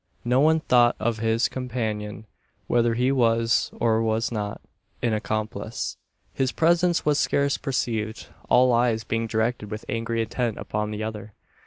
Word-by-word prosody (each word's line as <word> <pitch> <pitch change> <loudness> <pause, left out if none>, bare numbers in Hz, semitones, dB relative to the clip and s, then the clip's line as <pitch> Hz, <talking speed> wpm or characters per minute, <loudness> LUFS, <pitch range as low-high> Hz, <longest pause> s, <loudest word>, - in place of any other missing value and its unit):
No 125 +2 +3
one 160 +2 +4
thought 120 -4 +4
of 110 0 -1
his 115 +1 +2
companion 110 -5 -4 0.4
whether 120 -1 +2
he 125 +3 +2
was, 115 -2 +2
or 115 -1 +2
was 110 +1 0
not, 105 -2 -3 0.4
an 115 -2 +2
accomplice. 110 +1 -3 0.4
His 130 -1 0
presence 170 +1 +2
was 150 -1 +3
scarce 140 0 +1
perceived 110 -4 -2 0.2
all 125 0 +5
eyes 115 -1 +2
being 115 0 -2
directed 110 -1 -1
with 110 +1 -6
angry 115 0 -1
intent 115 0 -2
upon 105 0 -3
the 105 0 -4
other. 110 -1 -6
115 Hz, 150 wpm, -25 LUFS, 110-125 Hz, 0.4 s, all